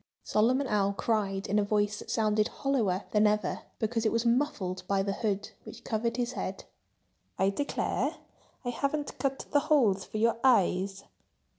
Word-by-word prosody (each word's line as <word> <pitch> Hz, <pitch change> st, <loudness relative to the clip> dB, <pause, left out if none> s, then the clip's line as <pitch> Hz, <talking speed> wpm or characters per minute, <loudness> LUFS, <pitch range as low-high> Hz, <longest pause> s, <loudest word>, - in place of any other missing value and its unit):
Solomon 250 Hz, +6 st, +2 dB
Owl 200 Hz, -4 st, +1 dB
cried 200 Hz, -2 st, -1 dB
in 205 Hz, +2 st, +1 dB
a -, -, +2 dB
voice 205 Hz, 0 st, 0 dB
that -, -, -10 dB
sounded 215 Hz, -1 st, +2 dB
hollower 220 Hz, -9 st, 0 dB
than 210 Hz, 0 st, +4 dB
ever, 210 Hz, 0 st, 0 dB, 0.2 s
because 225 Hz, +1 st, -1 dB
it 220 Hz, -, +2 dB
was 230 Hz, +1 st, 0 dB
muffled 235 Hz, -8 st, 0 dB
by 195 Hz, -1 st, +1 dB
the 200 Hz, 0 st, -1 dB
hood, 210 Hz, 0 st, -2 dB
which -, -, -11 dB
covered 230 Hz, +2 st, -1 dB
his 245 Hz, 0 st, -1 dB
head. 190 Hz, -5 st, -4 dB, 0.7 s
"I 195 Hz, +1 st, +3 dB
declare—I 275 Hz, 0 st, -4 dB
haven't 280 Hz, +4 st, -2 dB
cut 270 Hz, -1 st, -1 dB
the 290 Hz, -, +5 dB
holes 215 Hz, -11 st, +4 dB
for 215 Hz, -, -6 dB
your 230 Hz, +1 st, +2 dB
eyes!" 195 Hz, -5 st, +3 dB
215 Hz, 160 wpm, -29 LUFS, 200-240 Hz, 0.7 s, the